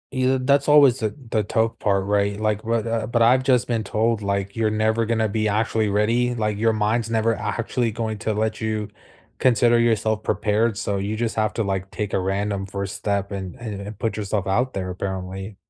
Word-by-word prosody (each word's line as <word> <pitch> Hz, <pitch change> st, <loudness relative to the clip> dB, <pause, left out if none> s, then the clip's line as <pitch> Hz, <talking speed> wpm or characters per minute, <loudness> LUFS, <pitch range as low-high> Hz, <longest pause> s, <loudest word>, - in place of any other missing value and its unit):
You'd 130 Hz, 0 st, +1 dB
that's 140 Hz, +1 st, +3 dB
always 140 Hz, -4 st, +6 dB
the 110 Hz, -2 st, -2 dB
the 110 Hz, -, +1 dB
tough 110 Hz, +2 st, 0 dB
part, 100 Hz, -2 st, +1 dB
right? 100 Hz, 0 st, +1 dB
Like, 110 Hz, 0 st, -1 dB
what, 115 Hz, 0 st, 0 dB
uh 115 Hz, -1 st, -1 dB
but 120 Hz, 0 st, 0 dB
I've 125 Hz, +3 st, +5 dB
just 130 Hz, -3 st, +3 dB
been 115 Hz, -3 st, -1 dB
told, 110 Hz, +2 st, 0 dB
like, 100 Hz, 0 st, -2 dB
"You're 110 Hz, -1 st, +2 dB
never 110 Hz, +1 st, +1 dB
gonna 110 Hz, -1 st, 0 dB
be 110 Hz, +1 st, 0 dB
actually 110 Hz, +1 st, +1 dB
ready," 115 Hz, +4 st, +1 dB
like, 105 Hz, -2 st, -1 dB
"Your 115 Hz, +1 st, +2 dB
mind's 110 Hz, +2 st, 0 dB
never 115 Hz, 0 st, +2 dB
actually 115 Hz, +1 st, -2 dB
going 110 Hz, 0 st, -3 dB
to 110 Hz, 0 st, -1 dB
let 110 Hz, +1 st, -1 dB
you 110 Hz, -1 st, -2 dB, 0.5 s
consider 120 Hz, -1 st, +4 dB
yourself 110 Hz, -2 st, +1 dB
prepared," 110 Hz, 0 st, 0 dB
so 100 Hz, -3 st, -2 dB
you 100 Hz, +2 st, -2 dB
just 115 Hz, 0 st, -2 dB
have 110 Hz, -1 st, +1 dB
to, 115 Hz, -, -1 dB
like, 95 Hz, -1 st, -3 dB
take 105 Hz, -1 st, -4 dB
a -, -, +2 dB
random 100 Hz, +1 st, -1 dB
1st 100 Hz, 0 st, -5 dB
step 100 Hz, -1 st, -2 dB
and 95 Hz, -3 st, -5 dB
and 110 Hz, -4 st, -6 dB
and 100 Hz, +1 st, -8 dB
put 115 Hz, -, -2 dB
yourself 100 Hz, -2 st, -2 dB
out 125 Hz, +7 st, +1 dB
there 95 Hz, -1 st, -3 dB
apparently. 95 Hz, +2 st, -5 dB
110 Hz, 205 wpm, -23 LUFS, 100-115 Hz, 0.5 s, always